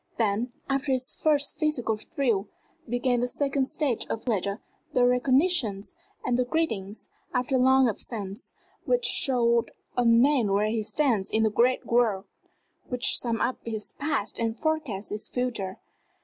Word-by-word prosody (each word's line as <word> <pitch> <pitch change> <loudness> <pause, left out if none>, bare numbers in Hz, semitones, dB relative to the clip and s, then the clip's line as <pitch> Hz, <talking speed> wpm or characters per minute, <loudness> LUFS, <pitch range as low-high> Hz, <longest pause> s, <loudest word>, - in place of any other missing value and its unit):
Then, 225 +2 0 0.2
after 275 +1 0
this 255 0 -2
first 290 -2 0
physical 275 -8 0
thrill, 215 -2 -1 0.4
began 245 +1 +1
the 245 - 0
second 275 +1 0
stage 270 -4 -1
of 225 - -4
pleasure 200 -3 -1 0.3
the 245 - +4
recognitions 250 - +2 0.3
and 250 -1 +1
the - - +4
greetings, 225 -8 -3 0.3
after 250 +2 +1
long 260 0 +5
absence, 205 -2 -5 0.3
which - - +1
show 235 - +3 0.3
a 245 - +2
man 235 -2 +4
where 210 +2 +2
he 220 0 0
stands 225 -3 0
in 220 - +2
the 220 - +2
great 245 +4 +2
world, 225 -5 +2 0.6
which 250 -1 +2
sum 230 -2 -1
up 255 - 0
his 220 -2 -3
past 280 -7 -2
and 230 0 -2
forecast 310 -11 -2
his 210 +1 -3
future. 230 -7 -3
245 Hz, 150 wpm, -27 LUFS, 215-265 Hz, 0.6 s, long